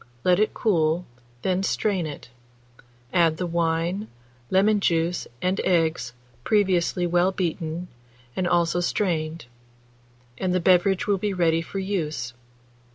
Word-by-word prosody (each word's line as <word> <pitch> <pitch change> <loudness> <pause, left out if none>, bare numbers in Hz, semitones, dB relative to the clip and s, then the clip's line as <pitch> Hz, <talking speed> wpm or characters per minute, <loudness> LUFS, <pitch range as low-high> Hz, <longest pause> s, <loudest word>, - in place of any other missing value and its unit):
Let 180 0 +4
it 215 - +1
cool, 170 -4 +1 0.4
then 185 0 +1
strain 195 -3 0
it; 145 -5 -9 0.8
add 165 -3 +3
the 180 - -2
wine, 170 +4 -1 0.4
lemon 205 +3 +3
juice, 170 -2 0 0.2
and 185 +2 +1
eggs, 160 -9 +1 0.3
previously 185 - +2
well 175 +2 +2
beaten, 170 -2 -3 0.5
and 185 - 0
also 175 0 +2
strained, 165 -4 -1 0.9
and 185 -1 0
the - - +3
beverage 185 +2 +3
will 200 -2 +1
be 205 0 -1
ready 165 -2 +2
for 180 - -7
use. 155 -11 -2
175 Hz, 125 wpm, -24 LUFS, 165-190 Hz, 0.9 s, Let